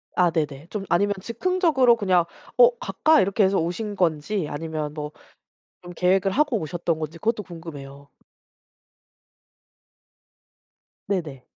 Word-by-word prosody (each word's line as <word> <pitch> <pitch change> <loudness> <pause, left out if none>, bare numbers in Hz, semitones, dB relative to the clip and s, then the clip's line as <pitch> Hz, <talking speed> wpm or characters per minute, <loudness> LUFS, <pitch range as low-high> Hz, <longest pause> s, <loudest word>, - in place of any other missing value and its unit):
아 175 -2 +3
네네. 150 -1 -3
좀 210 -1 -4
아니면 200 +4 +2
즉흥적으로 270 - +2
그냥 185 -5 +2 0.3
'어 - - +7
갈까?' 315 - +3
이렇게 200 +2 +2
해서 190 +1 +3
오신 205 +5 -3
건지, 165 +1 0
아니면 155 0 -4
뭐 150 -1 -5 0.7
좀 175 0 -9
계획을 190 +2 +2
하고 290 -1 +2
오셨던 170 0 -2
건지 160 +1 -6
그것도 225 0 -1
궁금해요. 140 -5 -10 3.0
네네. 155 -10 -3
180 Hz, 260 characters per minute, -24 LUFS, 155-210 Hz, 3.0 s, 어